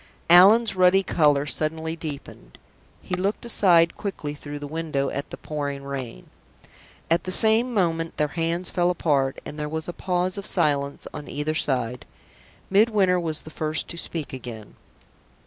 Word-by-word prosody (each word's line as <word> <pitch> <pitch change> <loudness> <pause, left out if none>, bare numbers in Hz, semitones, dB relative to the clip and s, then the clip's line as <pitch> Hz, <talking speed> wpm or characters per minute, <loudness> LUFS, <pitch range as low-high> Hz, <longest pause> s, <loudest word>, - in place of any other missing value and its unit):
Allan's 205 +6 +7
ruddy 185 +1 +4
color 145 -5 +2
suddenly 160 +2 -2
deepened; 145 - -9 0.5
he - - -7
looked 195 +5 -2
aside 175 -7 +4
quickly 155 -7 -5
through 145 0 -8
the 145 - -7
window 150 -2 -2
at 140 - -5
the - - -8
pouring 145 -2 -5
rain. 135 - -7 0.8
At 170 - +2
the 185 - -3
same 220 +5 +4
moment 165 -6 -1
their 150 -1 0
hands 170 +3 +2
fell 175 0 +1
apart, 140 -6 0
and 150 - -8
there 150 0 -3
was 160 +1 -4
a 175 - -5
pause 180 +2 -1
of 200 - -6
silence 145 -5 0
on 150 0 -8
either 150 +1 -2
side. 125 -5 -2 0.6
Midwinter 200 -3 +3
was 160 -3 -2
the 155 - -12
first 155 0 -3
to - - -5
speak 165 -4 -4
again. 120 -4 -9
160 Hz, 160 wpm, -24 LUFS, 145-180 Hz, 0.8 s, Allan's